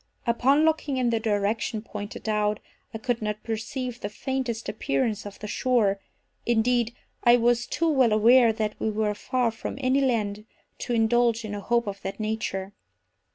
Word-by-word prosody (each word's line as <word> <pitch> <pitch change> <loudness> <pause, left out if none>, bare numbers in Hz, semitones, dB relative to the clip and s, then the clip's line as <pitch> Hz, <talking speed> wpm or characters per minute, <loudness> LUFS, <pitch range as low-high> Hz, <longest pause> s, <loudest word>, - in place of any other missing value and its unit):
Upon 265 +6 +3
looking 310 -4 +1
in 245 -2 +1
the 230 - +1
direction 215 +1 -1
pointed 205 -1 -7
out, 210 -1 +1 0.3
I - - -5
could 235 +1 -2
not 210 0 -3
perceive 240 +2 -4
the 205 - -3
faintest 245 0 -3
appearance 210 +3 -1
of 200 - -10
the - - -8
shore—indeed, 235 +1 0 0.3
I 240 0 +7
was 240 0 +2
too 330 +5 0
well 265 -6 +4
aware 230 +3 +6
that 215 -1 -2
we 220 - 0
were 215 0 0
far 245 +3 0
from 225 - -6
any 265 +1 +2
land 215 -5 -1 0.3
to 245 - -3
indulge 230 0 +2
in 210 - -5
a 205 - -3
hope 235 +3 +1
of 200 -1 -5
that 195 +2 -5
nature. 210 -3 -3
225 Hz, 165 wpm, -26 LUFS, 210-245 Hz, 0.3 s, I